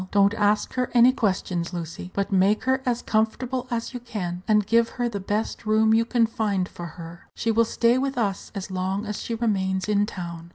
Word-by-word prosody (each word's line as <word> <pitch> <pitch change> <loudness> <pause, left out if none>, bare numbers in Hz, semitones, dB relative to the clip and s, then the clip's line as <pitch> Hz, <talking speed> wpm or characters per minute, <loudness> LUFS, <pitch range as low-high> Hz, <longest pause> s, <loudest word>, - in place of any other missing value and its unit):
Don't 200 +1 +4
ask 210 -1 +1
her 250 -1 -1
any 245 +2 +7
questions, 185 -6 -1
Lucy, 170 +1 -6
but 200 0 -1
make 195 +2 +3
her 260 0 +1
as 245 -1 0
comfortable 245 +4 -1
as 235 +1 -3
you 245 - -4
can, 185 -7 -5
and 210 -2 +3
give 230 +2 +3
her 245 -1 +1
the 210 -4 -4
best 205 +3 -2
room 220 0 +3
you 225 +1 +3
can 235 -1 +2
find 205 -5 -1
for 175 -2 -8
her. 170 0 -10
She 230 - 0
will 230 +1 +3
stay 235 +2 +2
with 275 0 -2
us 200 -5 -2
as 195 0 -5
long 190 +3 -2
as 210 -1 -4
she 230 - -3
remains 190 -5 0
in 205 -1 +2
town." 170 -4 -7
210 Hz, 210 wpm, -25 LUFS, 190-230 Hz, -, any